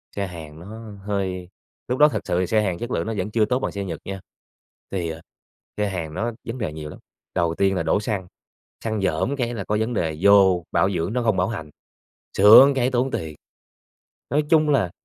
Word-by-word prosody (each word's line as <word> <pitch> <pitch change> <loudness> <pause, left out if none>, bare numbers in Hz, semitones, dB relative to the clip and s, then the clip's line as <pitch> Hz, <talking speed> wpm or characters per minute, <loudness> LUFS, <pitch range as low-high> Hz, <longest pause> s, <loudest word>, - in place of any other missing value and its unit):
Xe 100 -1 -2
Hàn 80 -3 -10
nó 105 +6 -9 0.2
hơi 95 -3 -3 0.4
lúc 125 +3 -2
đó 150 - +8
thật 115 -8 -2
sự 85 - 0
thì 90 - 0
xe 110 +3 +2
Hàn 95 -4 -1
chất 120 +4 -6
lượng - - -1
nó 115 - -2
vẫn 95 +2 -3
chưa 110 -1 +3
tốt 125 +3 0
bằng - - -2
xe 100 - -4
Nhật 85 -4 -5
nha. 95 0 -5 0.7
Thì, 90 -4 -2
ờ, 80 0 -7 0.6
xe 105 -1 0
Hàn 85 -5 -4
nó 115 +8 -2 0.2
vấn 115 +2 -4
đề 110 -11 -3
nhiều 75 -1 -7
lắm, - - -11 0.4
đầu 85 -2 +1
tiên 95 +1 +2
là 85 - -1
đổ 80 +5 +2
xăng, 105 -4 -3 0.6
xăng 110 -2 -2
rởm 95 - 0
cái 120 -3 -2
là 110 -4 -4
có 105 +2 -1
vấn 110 +2 -1
đề, 80 -7 -1
vô 95 -3 +5
bảo 95 - +2
dưỡng 90 +2 -2
nó 125 0 0
không 110 -5 +2
bảo 90 - +2
hành, 90 -9 -5 0.7
sửa 105 +7 +9
cái 130 -1 +1
tốn 130 +1 0
tiền. 80 - -4 0.9
Nói 150 +2 +2
chung 155 -2 +4
là 135 -12 +2
100 Hz, 225 wpm, -23 LUFS, 90-115 Hz, 0.9 s, sửa